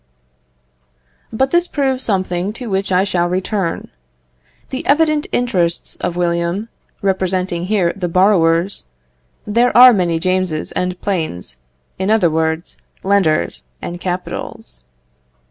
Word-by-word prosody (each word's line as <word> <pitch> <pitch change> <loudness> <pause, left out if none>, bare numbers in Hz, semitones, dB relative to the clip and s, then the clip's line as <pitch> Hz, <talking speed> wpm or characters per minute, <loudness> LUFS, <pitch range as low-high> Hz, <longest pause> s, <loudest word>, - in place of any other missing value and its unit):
But 265 +4 0
this 345 0 +2
proves 270 -4 -1
something 185 -1 -1
to 230 -1 -7
which 195 0 -1
I 185 +1 +4
shall 175 -3 0
return. 185 -1 -2 0.8
The 265 - -3
evident 305 0 +3
interests 180 -9 0
of 175 -1 -3
William, 175 +4 -1 0.3
representing 185 -2 0
here 185 -4 +1
the 180 -3 -3
borrowers, 175 - +2 0.6
there 235 +4 +2
are 250 0 +10
many 175 -5 +1
Jameses 185 -2 -1
and 180 0 -2
planes, 155 - -3 0.4
in 190 +1 -1
other 210 -7 +3
words, 160 +1 -1 0.3
lenders 185 - +1 0.2
and 175 0 -6
capitals. 180 - -5
185 Hz, 115 wpm, -18 LUFS, 170-210 Hz, 0.8 s, are